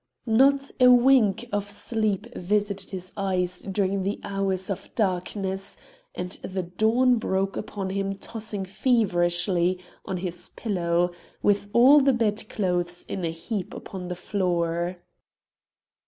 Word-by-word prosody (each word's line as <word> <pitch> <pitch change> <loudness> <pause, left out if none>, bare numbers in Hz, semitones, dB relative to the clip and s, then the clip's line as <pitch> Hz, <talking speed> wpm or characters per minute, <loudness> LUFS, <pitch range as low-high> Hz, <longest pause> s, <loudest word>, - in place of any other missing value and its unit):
Not 275 +5 +4
a 250 - +7
wink 240 -4 +5
of 205 0 -2
sleep 215 -1 -2
visited 200 +1 -1
his 185 -1 -6
eyes 180 -2 -1
during 195 0 -1
the 200 +3 -2
hours 195 -1 -1
of 195 - -5
darkness, 190 -1 -1 0.4
and 180 0 -4
the 185 -1 -3
dawn 225 +8 +3
broke 195 -2 -1
upon 195 -2 -4
him 195 0 -1
tossing 215 -2 -5
feverishly 185 -4 +2 0.3
on 190 - -3
his 175 -1 -4
pillow, 175 -4 0 0.3
with 205 0 +2
all 260 +6 +7
the 270 0 +4
bedclothes 195 -6 -1
in 185 - -4
a 165 - 0
heap 180 +4 -4
upon 185 -2 -7
the 180 - -3
floor. 175 -2 -1
195 Hz, 125 wpm, -26 LUFS, 180-215 Hz, 0.4 s, a